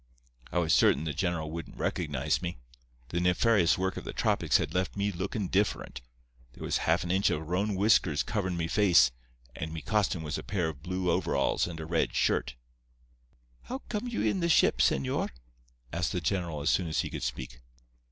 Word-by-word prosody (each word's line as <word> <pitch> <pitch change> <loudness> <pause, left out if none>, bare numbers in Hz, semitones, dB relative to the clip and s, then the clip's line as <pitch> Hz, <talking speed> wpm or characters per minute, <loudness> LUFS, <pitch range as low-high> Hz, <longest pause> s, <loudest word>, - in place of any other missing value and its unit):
I - - -2
was 85 -2 +2
certain 70 - +4
the 80 -2 -2
general 80 -1 -2
wouldn't 85 +1 -7
recognize 75 -3 -1
me. 90 -3 -4 0.5
The 85 - -1
nefarious 90 0 +3
work 95 0 -1
of - - -5
the - - -6
tropics - - +2
had - - -3
left 95 +2 -1
me 100 +1 0
lookin' 95 +2 -3
different. 95 -10 -1 0.5
There - - -10
was - - 0
half - - +3
an 85 - -2
inch 95 +2 +3
of 75 +1 -2
roan 100 +4 0
whiskers 95 -6 +3
coverin' 95 -5 -2
me 85 -1 -1
face, 85 - +5 0.4
and 80 +1 -5
me 80 -1 -6
costume 105 -6 0
was 75 0 -3
a - - -8
pair 90 -5 -1
of 75 -3 -9
blue 90 +1 -1
overalls 85 -5 +1
and 85 -2 -7
a 80 - -5
red 80 0 0
shirt. - - +1 1.1
"'How 255 - -5
you 270 - -6
come 220 +2 -2
in 225 -4 0
the 170 -1 0
ship, - - +4
señor?' 65 -1 +1 0.6
asked 85 0 -1
the 90 - 0
general 85 -3 -2
as 75 - +2
soon 90 - +1
as 80 - 0
he - - -5
could - - -5
speak. - - -5
85 Hz, 195 wpm, -29 LUFS, 80-95 Hz, 1.1 s, face